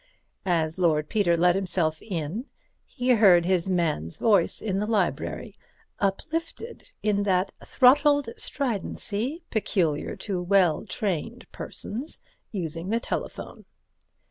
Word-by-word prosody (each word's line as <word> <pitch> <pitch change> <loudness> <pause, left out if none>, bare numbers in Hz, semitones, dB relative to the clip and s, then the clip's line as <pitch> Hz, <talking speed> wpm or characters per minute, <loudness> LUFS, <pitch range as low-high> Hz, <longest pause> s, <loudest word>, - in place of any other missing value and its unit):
As 165 -1 0
Lord 155 -4 +2
Peter 175 -6 +2
let 175 +1 +4
himself 175 -4 0
in 185 - -4 0.4
he 250 +1 -3
heard 195 -8 +6
his 185 0 +1
man's 160 - -1
voice 200 -7 +2
in 195 -3 -2
the 210 +1 -1
library, 205 -6 -1 0.5
uplifted 325 - -3
in 205 -1 +2
that 190 -1 +1
throttled 285 +1 +4
stridency 250 - -2
peculiar 180 -8 0
to 190 -4 -3
well 180 -4 +2
trained 215 +4 -3
persons 250 +9 -6 0.3
using 170 -2 -4
the 230 +2 +1
telephone. - - -5
195 Hz, 115 wpm, -26 LUFS, 170-225 Hz, 0.5 s, heard